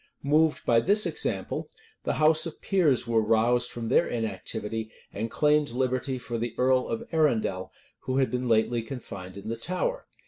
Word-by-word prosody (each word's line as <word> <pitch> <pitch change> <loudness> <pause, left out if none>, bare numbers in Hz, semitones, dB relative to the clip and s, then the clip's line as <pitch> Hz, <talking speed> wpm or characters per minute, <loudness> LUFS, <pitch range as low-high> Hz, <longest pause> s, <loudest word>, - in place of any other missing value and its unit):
Moved 155 +2 +2
by 115 -1 +4
this 205 - +4
example, - - -2 0.4
the - - +1
house 155 +2 +3
of 160 - -9
peers 165 - +2
were 115 -1 +2
roused 115 +3 +2
from 115 -1 -6
their 170 - +4
inactivity; 110 0 -3 0.2
and 110 +3 -3
claimed 150 +2 +2
liberty 130 +2 -1
for 120 -1 -5
the 115 0 -3
earl 130 0 +2
of 230 +1 -4
Arundel, 115 - +1 0.3
who 130 0 -3
had 135 -1 +2
been 125 0 -2
lately 115 +1 +2
confined 110 -6 -8
in 100 - -9
the 115 - -2
Tower. 185 - -3
125 Hz, 170 wpm, -27 LUFS, 115-150 Hz, 0.4 s, by